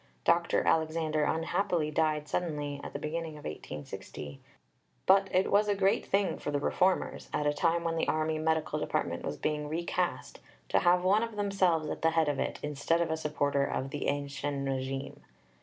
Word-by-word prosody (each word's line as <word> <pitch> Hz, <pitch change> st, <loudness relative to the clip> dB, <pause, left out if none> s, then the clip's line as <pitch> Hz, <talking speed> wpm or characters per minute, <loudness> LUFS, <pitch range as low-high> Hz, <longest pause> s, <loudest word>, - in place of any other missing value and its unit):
Dr. 170 Hz, 0 st, +3 dB
Alexander 155 Hz, -1 st, +1 dB
unhappily 165 Hz, -1 st, 0 dB
died 155 Hz, -1 st, +1 dB
suddenly 145 Hz, -5 st, -2 dB
at -, -, -6 dB
the -, -, -2 dB
beginning 160 Hz, +2 st, -4 dB
of 150 Hz, -, -11 dB
1860, 75 Hz, -1 st, -7 dB, 0.7 s
but 195 Hz, 0 st, +5 dB
it 185 Hz, +1 st, +2 dB
was 210 Hz, +1 st, +4 dB
a 205 Hz, -, +2 dB
great 195 Hz, 0 st, +2 dB
thing 195 Hz, -1 st, +1 dB
for -, -, -4 dB
the 145 Hz, -1 st, 0 dB
Reformers, 185 Hz, +5 st, 0 dB
at 150 Hz, -, -1 dB
a 145 Hz, -, +3 dB
time 170 Hz, +2 st, +1 dB
when 165 Hz, -1 st, -1 dB
the -, -, 0 dB
Army 155 Hz, 0 st, 0 dB
Medical 160 Hz, 0 st, 0 dB
Department -, -, -2 dB
was 75 Hz, -, -3 dB
being 150 Hz, -1 st, -2 dB
recast, 170 Hz, +2 st, -2 dB, 0.3 s
to -, -, +4 dB
have 180 Hz, +1 st, +4 dB
one 200 Hz, +4 st, +4 dB
of 230 Hz, -1 st, -3 dB
themselves 190 Hz, -6 st, +1 dB
at -, -, -4 dB
the 165 Hz, -, +4 dB
head 160 Hz, -2 st, +2 dB
of 145 Hz, -, -1 dB
it, -, -, -1 dB
instead 150 Hz, +3 st, 0 dB
of 170 Hz, -2 st, 0 dB
a -, -, +1 dB
supporter 145 Hz, -3 st, 0 dB
of 135 Hz, -1 st, -2 dB
the 145 Hz, -, -3 dB
ancien 140 Hz, 0 st, -2 dB
régime. 135 Hz, +1 st, -3 dB
155 Hz, 185 wpm, -30 LUFS, 145-170 Hz, 0.7 s, but